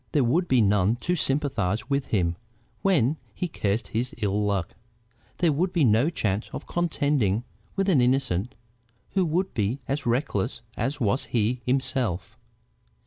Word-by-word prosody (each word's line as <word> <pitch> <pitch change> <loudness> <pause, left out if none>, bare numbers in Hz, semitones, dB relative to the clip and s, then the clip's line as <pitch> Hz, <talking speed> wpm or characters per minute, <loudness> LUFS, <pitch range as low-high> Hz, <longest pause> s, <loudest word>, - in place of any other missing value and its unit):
There 145 - +4
would 165 +10 +2
be 130 -2 +4
none 105 +1 +3
to 180 +6 +1
sympathize 135 - 0
with 140 -1 0
him 85 -5 +1 0.5
when 155 -7 +3 0.2
he 180 - -2
cursed 105 - -1
his 120 +3 -2
ill 105 -2 0
luck, 100 -2 -1 0.6
there 170 -3 +3
would 175 +6 0
be 170 -4 +2
no 115 +5 +4
chance 105 - -1
of - - -6
contending 145 - +1 0.3
with 195 0 0
an 160 -10 +4
innocent 125 -5 +1 0.6
who 190 - +2
would 180 +5 0
be 110 +5 0
as 140 -1 -2
reckless 120 -3 0
as 145 +2 -2
was 125 +2 +1
he 120 +2 0
himself. 125 -6 0
125 Hz, 150 wpm, -26 LUFS, 105-150 Hz, 0.6 s, There